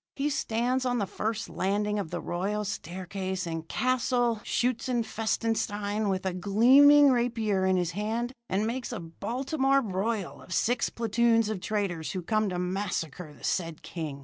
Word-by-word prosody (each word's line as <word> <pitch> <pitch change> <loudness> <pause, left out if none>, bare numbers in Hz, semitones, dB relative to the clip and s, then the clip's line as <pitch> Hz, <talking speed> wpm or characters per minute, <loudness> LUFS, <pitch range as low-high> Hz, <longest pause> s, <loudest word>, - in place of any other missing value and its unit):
He 290 +1 0
stands 250 -1 0
on 245 -1 0
the 205 - 0
first 215 +3 -3
landing 210 +2 -1
of 195 - -4
the - - -3
royal 205 +4 -2
staircase 190 0 -4
in 165 -1 -3
Castle 240 +3 0
Schutzenfestenstein 225 -3 -1
with 190 0 -1
a 190 - 0
gleaming 265 +10 +6
rapier 225 -6 +1
in 185 0 +3
his 175 -1 0
hand, 225 +6 -2 0.2
and 195 +3 +1
makes 245 +3 -3
a 235 - -4
Baltimore 265 - 0
broil 200 0 -2
of 185 - -5
six 245 +1 +1
platoons 230 -1 +2
of 215 -3 -2
traitors 195 -7 -2
who 185 -2 -4
come 215 +2 +1
to 180 - -3
massacre 180 -4 -3
the 140 - -17
said 165 -4 -2
king. 155 -5 -5
210 Hz, 155 wpm, -28 LUFS, 185-235 Hz, 0.2 s, gleaming